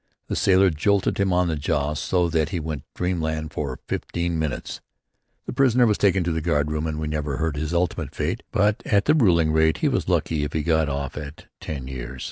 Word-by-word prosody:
The - - -1
sailor 95 0 +4
jolted 100 +7 +1
him 100 -1 +2
in 90 0 +2
the 80 - 0
jaw 75 0 -1
so 90 +3 +1
that 80 -2 +1
he 90 -2 -2
went 75 -3 -4
to 70 - -33
dreamland 80 -4 -2
for 70 -4 -3
fifteen 85 -1 -2
minutes. 75 -4 -3 0.6
The - - -5
prisoner 125 -2 +4
was 105 -3 +2
taken 95 -2 +3
to 85 - -1
the 80 0 -1
guardroom 75 -1 0
and 80 -1 -3
we 80 - -2
never 75 -2 -2
heard 80 -1 -1
his 75 +2 -3
ultimate 85 -4 -1
fate, - - -2
but 105 +1 +1
at 100 -2 +2
the - - +5
ruling 85 - +4
rate 80 0 +3
he - - +1
was - - 0
lucky 80 -3 +1
if 75 - -4
he 80 - -1
got 80 -1 +2
off 70 -1 -3
with 75 0 -8
ten 70 -4 -6
years. 65 -1 -7
80 Hz, 220 wpm, -24 LUFS, 75-90 Hz, 0.6 s, the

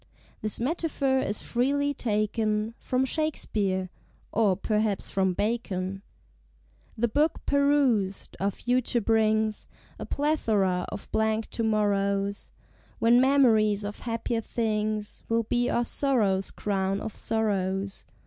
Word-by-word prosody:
(This 215 - +1
metaphor 275 -1 0
is 205 -4 -2
freely 285 +4 +1
taken 215 -1 0
From 255 0 0
Shakespeare 205 - -1 0.4
or 205 -3 +3
perhaps 210 -1 -1
from 190 -2 +1
Bacon.) 195 -3 -2 1.0
The 235 +2 +2
Book 295 +7 0
perused, 280 -9 +2
our 195 - +1
Future 245 +3 0
brings 220 -1 +1 0.3
A - - -6
plethora 215 -12 +1
of - - -7
blank 220 0 0
to - - -3
morrows, 200 -2 0 0.5
When 235 +2 +5
memories 225 -7 +4
of 205 0 -5
Happier 230 -1 -2
Things 215 -2 -2
Will 230 0 +2
be 240 +2 0
our 240 - +1
Sorrow's 215 -9 +1
Crown 195 -1 -1
of 215 - -6
Sorrows. 195 -3 -1
220 Hz, 115 wpm, -27 LUFS, 200-245 Hz, 1.0 s, When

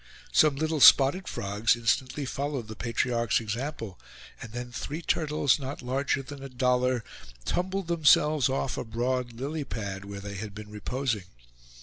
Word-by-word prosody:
Some 150 -3 +5
little 155 +2 -1
spotted 145 +7 +7
frogs 105 +4 +1
instantly 130 +5 0
followed 140 -3 -3
the 110 - -8
patriarch's 115 -1 0
example; 115 -2 -5 0.4
and 115 - -8
then 120 +1 -6
three 150 +6 -5
turtles, 150 -3 +2
not 135 -1 -6
larger 135 +2 0
than 140 +1 -9
a 135 - -7
dollar, 125 -1 +1 0.4
tumbled 185 0 -1
themselves 150 -4 +4
off 135 -1 -1
a - - -2
broad 120 +2 -2
"lily 145 +6 -4
pad," 100 -6 -5
where 100 0 -7
they 100 0 -7
had 105 0 -6
been 105 -1 -9
reposing. 115 -1 -2
125 Hz, 150 wpm, -28 LUFS, 115-145 Hz, 0.4 s, spotted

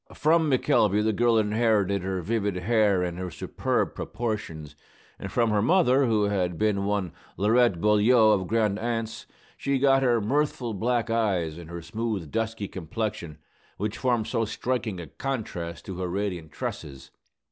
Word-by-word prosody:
From 160 0 +3
McElvey 105 -5 +3
the 110 0 +1
girl 120 +1 +3
inherited 105 -3 +2
her 95 0 -2
vivid 105 -1 -1
hair 100 -1 +2
and 90 0 -4
her 90 -1 -4
superb - - -2
proportions; 105 -10 -5 0.4
and 95 - -6
from 115 -2 +2
her 105 -1 +2
mother, 140 - +4
who 110 -2 +2
had 95 -4 0
been 100 -1 +1
one 100 -4 -1 0.3
Laurette 110 -2 +3
Beaulieu, 105 +5 +4
of 95 -3 +1
Grande 110 -1 +1
Anse, 115 -1 -3 0.3
she 140 0 0
got 135 0 +4
her 120 -3 +3
mirthful 125 0 -1
black 115 +2 0
eyes 95 -9 0
and 85 -2 -10
her 85 -1 -7
smooth, 105 -2 -4
dusky 115 -2 -2
complexion, 85 -3 -5 0.4
which 105 +3 -3
formed 120 -4 +1
so 115 0 -1
striking 115 -3 -2
a 85 - -6
contrast 90 - -5
to 95 -2 -6
her 90 - -2
radiant 90 -4 -3
tresses. 70 -1 -6
105 Hz, 160 wpm, -26 LUFS, 95-115 Hz, 0.4 s, mother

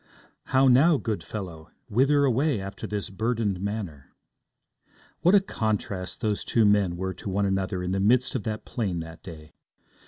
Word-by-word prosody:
'How 135 +1 +3
now, 140 +6 +5
good 105 -9 -3
fellow? 85 -5 -7 0.2
Whither 135 +5 +3
away 135 0 +1
after 95 +1 -6
this 105 -2 -4
burdened 110 -2 -1
manner?' 95 -9 -5 1.1
What 180 +4 +5
a - - +8
contrast 105 - -3
those 105 -2 0
two 115 -2 +2
men 100 -4 +3
were 95 +1 -3
to 100 - -7
one 100 +1 0
another 95 -1 -1
in 90 - -2
the 95 - 0
midst 125 +6 +3
of 130 - -1
that 110 -1 -4
plain 95 -8 -2
that 80 0 -10
day! 75 -3 -11
105 Hz, 165 wpm, -26 LUFS, 95-120 Hz, 1.1 s, a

